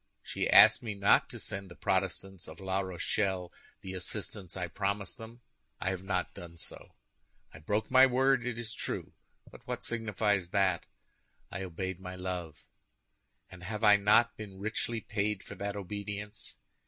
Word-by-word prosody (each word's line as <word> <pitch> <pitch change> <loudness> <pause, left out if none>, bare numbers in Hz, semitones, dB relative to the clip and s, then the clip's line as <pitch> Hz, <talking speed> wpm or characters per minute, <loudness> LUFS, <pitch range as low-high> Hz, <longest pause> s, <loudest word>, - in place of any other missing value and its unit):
She - - -2
asked - - +9
me 110 -3 -4
not 100 0 +4
to - - -7
send 95 0 -4
the 85 - -11
Protestants 95 0 -1
of 80 - -10
La 95 0 0
Rochelle 95 0 -1 0.3
the 95 - -6
assistance 95 0 -4
I 90 - -1
promised 100 +5 -2
them; 115 +2 -10 0.4
I 95 - 0
have 95 -1 -4
not 95 -1 -1
done 85 -1 -10
so. - - -8 0.6
I - - -10
broke 105 +9 -1
my 130 +1 +8
word, 130 0 +3
it 125 -1 -2
is 115 -2 -4
true; - - -4 0.4
but - - -13
what - - -3
signifies 105 -5 0
that? 95 -3 +2 0.6
I 100 - -4
obeyed 95 0 -4
my 90 -1 -7
love; 90 -4 -5 0.9
and 90 - -11
have 105 +4 -4
I 105 -1 +9
not 105 +4 +5
been 100 -3 -9
richly 110 +3 -2
paid 105 -1 -1
for - - -9
that 100 0 -4
obedience? 105 +1 -6
100 Hz, 165 wpm, -31 LUFS, 95-105 Hz, 0.9 s, asked